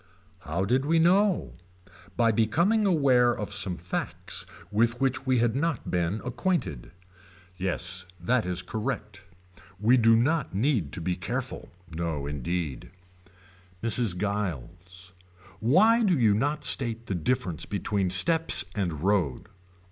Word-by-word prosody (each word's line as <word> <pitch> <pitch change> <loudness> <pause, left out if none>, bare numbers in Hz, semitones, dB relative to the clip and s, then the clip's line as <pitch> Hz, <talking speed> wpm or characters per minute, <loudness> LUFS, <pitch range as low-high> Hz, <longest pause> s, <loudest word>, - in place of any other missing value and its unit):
How 85 +2 -3
did 125 +6 +1
we 165 +2 +2
know. 185 +3 +2 0.6
By 115 -1 +3
becoming 170 - +2
aware 130 -8 +3
of 105 -1 -5
some 95 -3 -1
facts 85 +1 -4 0.2
with 115 +3 +1
which 135 0 -1
we 130 -1 +3
had 120 0 +1
not 165 +3 -2
been 90 +4 -1
acquainted. 125 - -2 0.7
Yes 90 0 -2
that 110 +4 0
is 90 0 -2
correct. 105 -1 -5 0.6
We 115 +5 +4
do 115 -1 +5
not 135 - 0
need 105 - 0
to - - -5
be 90 +2 -1
careful. 120 +8 -5 0.2
No 80 -3 -4
indeed. 75 +1 -4 0.9
Mrs. 115 -5 +3
Giles. 90 -2 -5 0.5
Why 200 - +4
do 190 -7 +2
you 110 -5 +4
not 145 +8 -1
state 115 -3 +2
the 100 - -3
difference 90 - -2
between 100 -2 -1
steps 160 - +4
and 85 -8 -3
road. 95 -5 0
110 Hz, 130 wpm, -27 LUFS, 90-130 Hz, 0.9 s, do